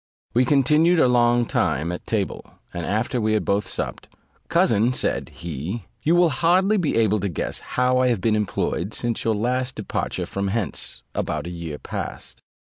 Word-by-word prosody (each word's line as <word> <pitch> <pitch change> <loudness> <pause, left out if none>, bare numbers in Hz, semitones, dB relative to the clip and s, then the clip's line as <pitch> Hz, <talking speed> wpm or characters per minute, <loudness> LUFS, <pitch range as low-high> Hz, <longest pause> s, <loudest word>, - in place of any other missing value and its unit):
We 125 +3 +4
continued 150 +5 +4
a 130 - +5
long 120 -1 +3
time 80 - 0
at 90 - -6
table, - - -2 0.2
and 85 -1 -4
after 120 +4 0
we 110 0 +1
had 110 - +1
both 100 0 +1
supped; - - -4 0.4
"Cousin," 115 +3 +3
said - - -1
he, 85 - -5 0.2
"you 165 +3 +3
will 175 -2 +4
hardly 185 +8 +3
be 175 -6 0
able 110 -2 +3
to 100 +1 -1
guess 80 - -3
how 125 0 +1
I 130 - +3
have 120 -5 +1
been 110 +3 +2
employed 105 -1 -1
since 120 -2 -2
your 110 -1 +1
last 125 +4 -1
departure 105 - -3
from 100 0 -3
hence, 105 0 -3
about - - -2
a 85 - -5
year 85 -3 -5
past. - - -7
115 Hz, 180 wpm, -23 LUFS, 100-130 Hz, 0.4 s, a